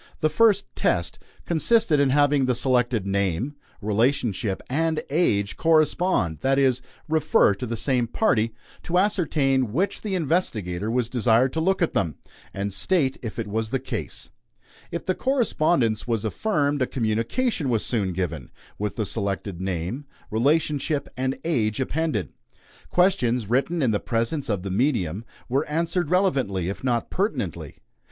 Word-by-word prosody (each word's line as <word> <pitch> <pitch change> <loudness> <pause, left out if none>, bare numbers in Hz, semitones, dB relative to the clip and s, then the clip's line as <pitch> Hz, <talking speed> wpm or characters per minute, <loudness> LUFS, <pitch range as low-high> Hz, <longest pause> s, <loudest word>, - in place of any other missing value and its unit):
The 155 - +3
first 210 -3 +4
"test" - - 0 0.3
consisted 175 -1 +3
in 140 -1 +3
having 145 -1 +3
the 125 - +2
selected 125 -4 +2
name, 100 - -1 0.3
relationship, 110 -2 0
and 160 +3 0
age 105 - +1
correspond 155 - +2
that 135 0 +2
is, 130 -2 +3 0.3
refer 155 -9 +3
to 110 +6 -5
the 115 0 -3
same 125 0 +1
party; 115 - +1 0.3
to 175 - -1
ascertain 145 - +2
which 185 - -1
the 205 -3 -2
investigator 110 - -1
was 120 0 0
desired 120 +1 +2
to 160 - -1
look 190 +1 +2
at 170 - 0
them, 80 -7 0 0.4
and 100 0 -3
state 135 - +1
if 115 -2 -6
it 115 - -2
was 110 +1 -2
the 135 - 0
case. 120 - -4 0.6
If 170 - -5
the 185 - +1
correspondence 170 - +1
was 115 -2 -1
affirmed, 145 - 0
a 130 - +2
communication 130 - -1
was 115 -3 +1
soon 100 -6 0
given, 85 -7 -4 0.3
with 105 0 -2
the 110 - -1
selected 100 -3 -3
name, 95 - -3 0.3
relationship, 145 +4 +1
and 130 +1 -1
age 115 -10 0
appended. 135 - -1 0.6
Questions, 125 - +2
written 140 +8 +1
in 120 - +3
the 105 - +1
presence 115 +5 -2
of 100 -4 -1
the 100 - -4
medium, 105 - 0 0.2
were 135 +4 +1
answered 165 +1 0
relevantly, 135 - +1
if 100 - -6
not 120 -3 -1
pertinently. 100 - -2
130 Hz, 150 wpm, -24 LUFS, 105-160 Hz, 0.6 s, first